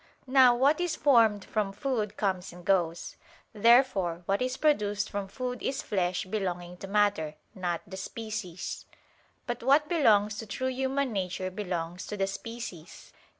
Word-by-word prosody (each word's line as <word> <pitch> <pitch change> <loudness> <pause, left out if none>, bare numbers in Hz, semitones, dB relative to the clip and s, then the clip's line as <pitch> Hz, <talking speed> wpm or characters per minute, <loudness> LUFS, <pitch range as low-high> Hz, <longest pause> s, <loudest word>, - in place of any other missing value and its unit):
Now 255 -2 +6
what 280 +7 +3
is 350 -3 0
formed 225 -8 +4
from 210 -3 -1
food 215 -1 -2
comes 190 -3 -1
and 175 0 -13
goes. 175 -3 0 0.4
Therefore 210 -6 +3
what 195 +4 0
is 255 0 -1
produced 210 -9 +1
from 200 -1 -3
food 250 +4 -5
is 270 +1 -2
flesh 180 -2 -1
belonging 180 -3 -3
to 195 - -8
matter, 200 -7 +1 0.2
not 175 -3 -3
to - - -21
the 190 - -6
species. 210 -3 -5 0.6
But 240 -1 -3
what 280 +5 +4
belongs 215 -10 +3
to 225 - -6
true 260 +5 -2
human 265 0 -1
nature 185 -1 -2
belongs 180 -3 -4
to 210 - -5
the 195 - +1
species. 195 -4 -8
205 Hz, 155 wpm, -29 LUFS, 185-250 Hz, 0.6 s, Now